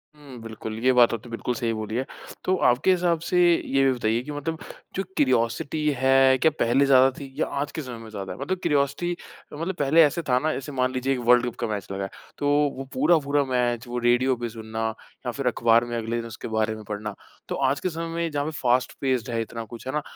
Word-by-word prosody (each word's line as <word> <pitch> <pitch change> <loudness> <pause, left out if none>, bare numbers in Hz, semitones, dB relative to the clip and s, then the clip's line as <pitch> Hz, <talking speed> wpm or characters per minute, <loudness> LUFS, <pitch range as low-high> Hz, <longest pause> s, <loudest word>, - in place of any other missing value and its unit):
हुँ। 140 -4 -12
बिल्कुल 110 -1 -7
ये 130 - +5
बात 120 -1 +6
तो - - -1
आप - - -20
तो 120 - -11
बिल्कुल 115 +1 -3
सही 115 0 -1
बोली 110 0 -4
है। 130 +2 -1 0.4
तो 185 - +3
आपके 125 +10 +3
हिसाब 175 -2 +2
से, 175 +2 -1 0.3
ये 135 0 +2
भी 135 - +4
बताइए 115 -1 0
कि 150 - -7
मतलब 150 +2 -4 0.4
जो 195 - -1
क्यूरोसिटी 130 +4 +1
है 130 0 +5
क्या 160 - +3
पहले 120 +4 +3
ज़्यादा 135 -1 +6
थी 135 -2 -8
या - - +2 0.2
आज 145 - -3
के 160 - -4
समय 125 -3 -7
में 110 - -10
ज़्यादा 100 -3 -6
है? - - -12
मतलब 155 +8 -2
क्यूरोसिटी 145 +5 +1 0.4
मतलब 165 +6 -3
पहले 150 +3 +5
ऐसे 155 +3 +1
था 125 - +4
ना 155 +3 0
जैसे 135 +2 -5
मान 130 -2 0
लीजिए 130 +1 0
एक 130 - -2
वर्ल्ड्कप 120 0 +4
का - - -1
मैच 105 -3 -4
लगा 95 0 -3
है 95 - -4 0.3
तो 145 - -1 0.3
वो 135 - -4
पूरा-पूरा 145 0 +3
मैच, 125 -1 0
वो 120 - -4
रेडियो 120 +2 +3
पे 120 -1 -4
सुनना 110 0 -4 0.4
या 125 - -1
फ़िर 140 +1 -3
अख़बार 115 -1 +3
में 120 0 -4
अगले 115 +1 -2
दिन 115 - -4
उसके 110 - -8
बारे 110 -1 0
में 110 - -10
पढ़ना, 105 0 -5 0.3
तो - - -1
आज 135 0 +1
के 185 - -1
समय 165 0 -4
में 170 0 -1
जहाँ 145 -1 -1
पर 155 - -3
फ़ास्ट 125 -4 +1
पेस्ड 130 -2 0
है 115 - 0
इतना 115 +1 -5
कुछ 120 +3 -10
है 130 - -3
ना 150 - 0
130 Hz, 245 wpm, -25 LUFS, 115-145 Hz, 0.4 s, बात